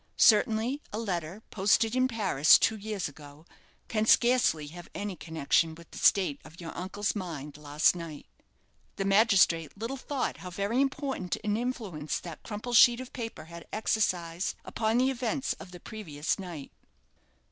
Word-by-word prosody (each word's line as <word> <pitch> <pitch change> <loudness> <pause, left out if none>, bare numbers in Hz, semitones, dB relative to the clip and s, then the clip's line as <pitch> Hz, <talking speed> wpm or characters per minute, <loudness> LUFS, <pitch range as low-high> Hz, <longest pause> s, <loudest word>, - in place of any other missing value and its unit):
Certainly, 225 +5 +4
a 210 - -4
letter, 190 -2 -4
posted 215 +3 +2
in 255 0 +3
Paris 195 - +5
two 220 - +2
years 210 -2 -4
ago, 145 +1 -13 0.4
can 220 -1 0
scarcely 240 -13 +4
have 175 +2 -11
any 205 -2 -4
connection 160 0 0
with 170 0 -16
the - - -8
state 180 -8 +3
of 165 - -15
your 165 -2 -7
uncle's 200 +4 -2
mind 155 -7 -6
last 150 +3 +2
night." 165 -4 -8 0.7
The 195 - -2
magistrate 195 -6 +3
little 230 +6 -4
thought 275 0 -3
how 180 - -8
very 200 +8 0
important 270 - -2
an 210 -1 0
influence 215 -11 -3
that 170 -3 -9
crumpled 230 +2 -1
sheet 240 +1 +7
of 255 -1 -8
paper 230 -8 -6
had 170 +1 -11
exercised 180 -5 -1
upon 220 +1 0
the 260 +2 +3
events 255 +1 -1
of 195 - -10
the 180 -1 -11
previous 165 -7 -4
night. 170 -7 -7
200 Hz, 160 wpm, -29 LUFS, 165-225 Hz, 0.7 s, sheet